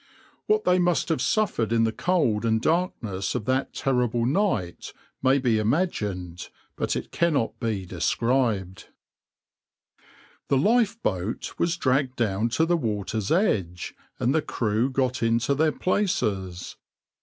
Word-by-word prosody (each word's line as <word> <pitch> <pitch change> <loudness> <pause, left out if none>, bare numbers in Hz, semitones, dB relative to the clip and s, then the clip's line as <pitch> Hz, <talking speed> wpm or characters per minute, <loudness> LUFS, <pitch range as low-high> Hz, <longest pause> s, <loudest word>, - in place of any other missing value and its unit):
What 430 0 +2
they 180 - +3
must 175 -1 +1
have 160 - 0
suffered 185 - 0
in 115 -1 +3
the 110 - +2
cold 125 -8 +1
and 110 -1 +2
darkness 115 - -1
of 115 -4 -2
that 130 +2 0
terrible 125 -3 0
night 130 - -1 0.3
may 130 +1 +4
be 120 -5 +1
imagined, 105 - -2 0.3
but - - -1
it - - -5
cannot 155 -9 0
be 105 -5 -2
described.\par 115 -3 -4 0.4
The 140 - +2
lifeboat 205 - 0
was 170 0 +1
dragged 130 -2 +1
down 110 -1 0
to 160 +8 +2
the 175 +1 +2
water's 105 - -2
edge, 100 - 0 0.2
and 125 - +1
the 160 - +2
crew 115 -1 0
got 130 -1 -1
into 115 +4 +2
their 155 +2 +2
places. 110 - -1
125 Hz, 130 wpm, -25 LUFS, 105-160 Hz, 0.4 s, may